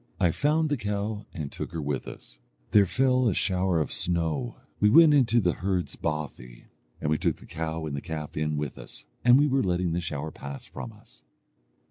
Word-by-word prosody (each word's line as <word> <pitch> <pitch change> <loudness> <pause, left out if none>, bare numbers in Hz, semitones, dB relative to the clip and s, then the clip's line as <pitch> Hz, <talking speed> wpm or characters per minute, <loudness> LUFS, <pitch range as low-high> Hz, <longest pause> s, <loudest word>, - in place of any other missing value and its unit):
I 85 - +3
found 155 - +1
the 145 - 0
cow, 105 0 -3
and 75 -4 -5
took - - -6
her 85 - -3
with 70 -3 -3
us. - - -11 0.3
There 100 -2 +6
fell 130 +2 +2
a 100 - +1
shower 90 -2 +1
of 75 - -2
snow. 80 -7 -1 0.2
We 105 - +5
went 160 +6 +8
into 120 -5 +4
the 90 -5 +2
herd's 90 -2 -2
bothy, 60 -6 -5 0.3
and 75 - -1
we 80 - +1
took - - +1
the - - -16
cow 80 0 -4
and 75 -2 -4
the 70 - -4
calf 80 -2 -6
in 75 -1 -1
with 75 -2 -4
us, - - -11 0.2
and 120 +1 +7
we 145 - +4
were 135 -2 +2
letting 90 -2 0
the 85 +2 -1
shower 75 -1 -4
pass 70 -1 -8
from 65 - -8
us. - - -20
85 Hz, 205 wpm, -27 LUFS, 75-105 Hz, 0.3 s, went